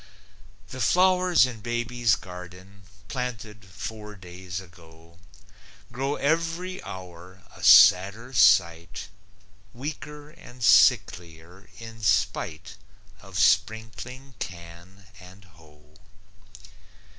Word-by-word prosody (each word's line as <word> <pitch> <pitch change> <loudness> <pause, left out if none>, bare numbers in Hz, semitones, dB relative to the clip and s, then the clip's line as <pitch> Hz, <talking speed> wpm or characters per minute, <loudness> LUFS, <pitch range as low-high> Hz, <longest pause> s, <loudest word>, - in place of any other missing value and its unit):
The 130 +3 -7
flowers 180 -3 +3
in 120 -4 -8
baby's 120 -1 0
garden, 90 +2 -12 0.3
"Planted" 110 -4 -6
four 105 +2 -9
days 90 -1 -8
ago, 85 -1 -17 0.7
Grow 135 +4 -2
every 165 +5 -2
hour 90 0 -11
a - - -13
sadder 105 +7 +6
sight, 85 -3 +2 0.7
Weaker 150 +2 -8
and 125 -4 -13
sicklier, 95 -5 +2
in 115 0 -11
spite 95 -2 -1 0.4
Of 95 -1 -9
sprinkling 110 +7 -1
can 85 +2 -10
and 95 +2 -15
hoe. 75 -2 -22
100 Hz, 85 wpm, -25 LUFS, 90-125 Hz, 0.7 s, sadder